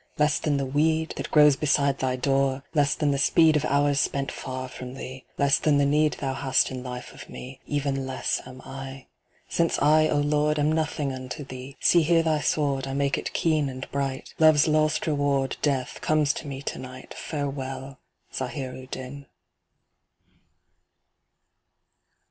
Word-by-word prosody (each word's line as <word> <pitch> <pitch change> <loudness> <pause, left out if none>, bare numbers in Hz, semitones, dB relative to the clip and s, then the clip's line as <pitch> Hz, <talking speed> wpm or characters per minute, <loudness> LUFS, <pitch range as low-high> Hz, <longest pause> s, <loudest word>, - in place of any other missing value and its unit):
Less 150 -1 +2
than 145 -2 0
the 140 - -1
weed, 155 +4 +1
that - - -4
grows 150 -2 +6
beside 140 -1 +1
thy 130 -1 0
door, 135 +1 +1
Less 145 -3 +2
than 150 -2 +1
the 140 - 0
speed 160 +2 +5
of 150 - +1
hours 145 0 +2
spent 140 0 0
far 130 0 -5
from 125 0 -8
thee, 130 -1 -8
Less 140 -1 +3
than 150 -2 +3
the 145 - +3
need 150 +2 +3
thou 135 -2 -3
hast 135 0 +1
in 130 -1 -5
life 125 -1 -7
of - - -12
me. 130 +1 -9
Even 140 -2 -1
less 130 - -1
am 130 0 -11
I. 135 0 -8 0.4
Since 170 -1 +1
I, 155 +1 +5
O 150 - +1
Lord, 150 +1 +1
am 150 +1 +2
nothing 155 -3 -1
unto 130 +3 -6
thee, 130 +1 -9
See 170 - +5
here 165 +1 +3
thy 155 -2 +1
Sword, 140 -3 0
I 135 - -3
make 140 0 +1
it - - -4
keen 155 -4 +1
and 130 0 -7
bright, 135 -1 -3
Love's 155 -2 +6
last 155 -1 +2
reward, 140 -3 0
Death, 135 -4 -1
comes 155 -2 +2
to 150 - -7
me 135 0 -6
to - - -4
night, 130 0 -9
Farewell, 135 -2 -5 0.3
Zahir 130 0 -4
u 130 0 -10
din. 135 +2 -8
140 Hz, 170 wpm, -26 LUFS, 130-150 Hz, 0.4 s, grows